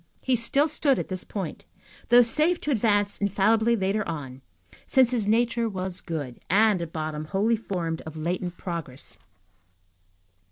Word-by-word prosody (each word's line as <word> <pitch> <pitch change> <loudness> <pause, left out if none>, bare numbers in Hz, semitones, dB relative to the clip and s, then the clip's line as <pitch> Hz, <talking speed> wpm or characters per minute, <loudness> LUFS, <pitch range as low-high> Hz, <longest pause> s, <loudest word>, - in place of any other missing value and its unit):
He 260 - +2
still 260 +6 +2
stood 285 -3 +2
at - - -4
this 185 -1 -4
point, 190 -6 -6 0.4
though 245 +1 +8
safe 310 +9 +1
to 300 - -1
advance 205 -4 +1
infallibly 220 +4 +2
later 200 +1 0
on, 135 -5 -6 0.5
since 260 -2 +4
his 230 -5 0
nature 230 +1 +1
was 185 -2 -4
good, 145 -8 -5
and, 205 -1 +4
at 165 -2 -5
bottom, 155 -1 -4
wholly 205 +7 +1
formed 175 -7 -3
of 160 0 -9
latent 175 +2 -3
progress. 145 -9 -6
200 Hz, 150 wpm, -26 LUFS, 165-230 Hz, 0.5 s, though